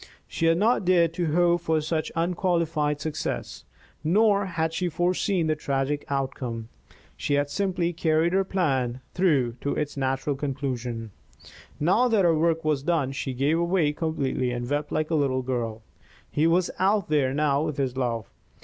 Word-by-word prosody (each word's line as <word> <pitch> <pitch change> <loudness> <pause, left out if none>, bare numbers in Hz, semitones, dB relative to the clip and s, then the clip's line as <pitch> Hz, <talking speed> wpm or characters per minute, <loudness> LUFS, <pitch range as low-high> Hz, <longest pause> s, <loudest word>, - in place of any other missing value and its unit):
She 165 - -1
had 165 0 +4
not 220 +3 +2
dared 175 -3 +3
to 165 -2 -1
hope 175 -1 +3
for 160 -2 +1
such 155 0 -2
unqualified 165 -4 0
success, 155 0 -4 0.4
nor 200 +4 +3
had 165 -2 -1
she 180 +1 -1
foreseen 175 +2 0
the 155 0 +1
tragic 140 0 -2
outcome. 130 -4 -3 0.5
She 145 - -1
had 145 0 0
simply 180 -3 0
carried 160 +1 +1
her 195 0 +3
plan 135 -10 -1
through 140 -10 +2
to 140 - -1
its 150 -1 -2
natural 135 +1 -1
conclusion. 125 -5 -4 0.7
Now 190 +11 +3
that 215 -6 +3
her 170 - +5
work 165 0 +1
was 150 -3 +1
done, 150 -3 0
she 135 -1 -4
gave 145 +6 +1
way 170 -4 +2
completely 145 -5 -1
and 120 0 -3
wept 145 +2 -2
like 155 +1 -1
a 155 -2 +3
little 130 -2 0
girl. 115 -3 -3 0.5
He 155 +2 +2
was 175 +2 +2
out 195 +1 +2
there 145 -4 +2
now 145 0 +1
with 155 -2 -2
his 130 -3 -1
love. 120 -4 -1
155 Hz, 165 wpm, -26 LUFS, 135-170 Hz, 0.7 s, her